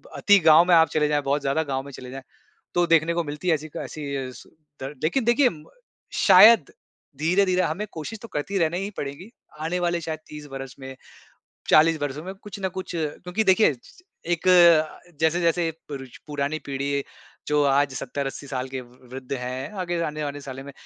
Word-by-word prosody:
अति 205 -1 +5
गाँव 160 +2 +8
में 180 -1 +5
आप 160 -2 +5
चले 150 -1 +1
जाएँ, 145 -1 +1
बहुत 140 +1 0
ज़्यादा 140 +3 0
गाँव 135 -3 -3
में 140 - -10
चले 125 -1 -10
जाएँ, 135 0 -8 0.5
तो 175 0 +3
देखने 165 0 +3
को 170 0 0
मिलती 150 +4 -6
है 165 - +5
ऐसी-ऐसी 145 -3 -6
स 120 - -13 0.4
दर 135 +2 -6
लेकिन 235 +11 +1
देखिए 245 +3 +4
म 155 -2 -13 0.5
शायद 220 -9 +7 0.5
धीरे-धीरे 180 +4 +2
हमें 180 +7 -2
कोशिश 185 +7 -7
तो - - -7
करती 195 +7 -2
रहना 170 0 +1
ही 195 +2 -3
पड़ेगी, 145 +9 -6 0.3
आने 175 +3 -1
वाले 175 -1 0
शायद 155 -1 -4
30 150 -1 -10
वर्ष 135 -1 -7
में 135 0 -8 0.7
40 160 0 +5
वर्षों 145 +1 -3
में 190 +1 -6
कुछ 200 0 -10
न - - +2
कुछ 185 -1 -5
क्योंकि 180 +6 -2
देखिए 190 -3 +5
स 130 - -20 0.2
एक 175 -1 0 0.8
जैसे-जैसे 165 +1 +2 0.2
पुरुष 135 -4 -8
पुरानी 145 +1 -2
पीढ़ी 140 0 -2 0.5
जो 150 0 +3
आज 140 0 +2
70-80 135 +2 -5
साल 130 -1 -3
के 130 0 -5
वृद्ध 125 +1 -11
हैं, 130 +2 -4
आगे 175 -2 -2
आने 155 -1 -3
वाले 145 0 -5
सालों 135 -1 -8
में 140 - -10
150 Hz, 185 wpm, -24 LUFS, 140-175 Hz, 0.8 s, गाँव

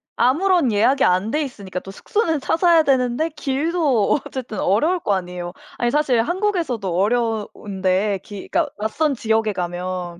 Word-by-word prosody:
아무런 330 +1 +3
예약이 225 +7 +3
안 185 +4 +2
돼 300 - 0
있으니까 200 -10 -5
또 195 - -10
숙소는 325 - -1
찾아야 335 +2 +3
되는데 265 +2 +1
길도 295 - 0
어쨌든 245 -5 -6
어려울 310 - +2
거 210 - 0
아니에요. 180 -2 -4 0.2
아니 240 0 0
사실 275 -5 +2
한국에서도 335 - -1
어려운데 205 -3 0
길 205 -2 -9
그러니까 325 -3 +1
낯선 275 +8 0
지역에 220 -2 0
가면. 175 -1 -4
235 Hz, 355 characters per minute, -21 LUFS, 195-305 Hz, 0.2 s, 아무런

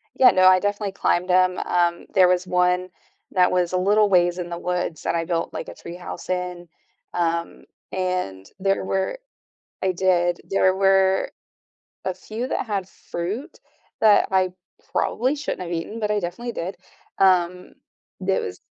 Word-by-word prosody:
Yeah, 260 - +7
no, 185 0 +4
I 185 0 +7
definitely 205 0 -2
climbed 180 -1 0
'em. 185 0 +4
Um, 175 -1 0
there 185 -1 +6
was 180 0 +1
one, 180 0 +2 0.4
that 180 -1 +3
was 180 -1 +1
a - - +2
little 205 +3 +3
ways 175 -2 +3
in 175 -1 -4
the 170 - -4
woods 180 -2 -3
that - - 0
I 165 0 -1
built, 165 -1 -2
like, - - -5
a - - -9
tree 170 - -9
house 180 0 -8
in, 180 -1 -3 0.4
um, 170 -1 -2 0.3
and 180 - -2
there 195 0 +1
were 190 - -1 0.6
I 190 - +1
did. 175 -1 +1
There 190 -1 +2
were 195 0 +3 0.7
a 185 - 0
few 220 +7 -5
that - - -2
had 200 -4 -2
fruit 200 - -6 0.4
that 210 -2 +6
I 185 -1 +2 0.4
probably 260 +6 0
shouldn't 285 -9 -4
have 175 - -6
eaten, 175 +7 -4
but 210 -1 -1
I 210 - +2
definitely 220 +6 -4
did. 180 0 -5 0.4
Um, 180 -1 +2 0.4
there 190 0 0
was 90 0 -6
185 Hz, 165 wpm, -23 LUFS, 175-195 Hz, 0.7 s, Yeah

